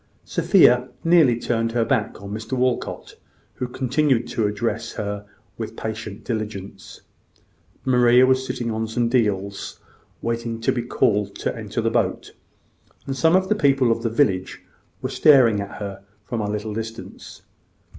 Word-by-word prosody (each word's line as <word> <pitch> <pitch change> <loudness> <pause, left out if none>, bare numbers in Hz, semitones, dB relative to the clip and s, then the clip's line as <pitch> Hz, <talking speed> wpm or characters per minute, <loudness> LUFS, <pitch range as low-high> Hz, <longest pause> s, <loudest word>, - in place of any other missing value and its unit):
Sophia 125 +1 +4
nearly 160 -9 +4
turned 115 -1 -1
her 120 -1 +1
back 115 -5 0
upon 100 +1 -9
Mr 110 +3 -6
Walcot, 125 -1 -2 0.4
who 125 - -4
continued 130 -1 +1
to 110 -2 0
address 115 +2 -3
her 100 -1 -5 0.3
with 110 - -5
patient 110 -2 -6
diligence. 105 -4 -6 0.8
Maria 125 -1 +5
was 130 0 +2
sitting 125 -3 -3
on 110 0 -2
some 115 +1 0
deals, 100 -5 -1 0.4
waiting 115 0 -3
to 115 - +1
be 120 - -1
called 105 -4 0
to - - -3
enter - - -4
the - - 0
boat; - - -1 0.7
and 135 - -3
some 160 +5 +3
of 190 0 +2
the 215 - +3
people 135 - +3
of 115 - 0
the 115 - -1
village 100 -7 0 0.4
were - - 0
staring 125 -9 +5
at 100 - -7
her 100 -1 -7 0.2
from 120 -3 -3
a 105 - -2
little 105 +1 -3
distance. 115 +1 -8
115 Hz, 155 wpm, -22 LUFS, 105-125 Hz, 0.8 s, Maria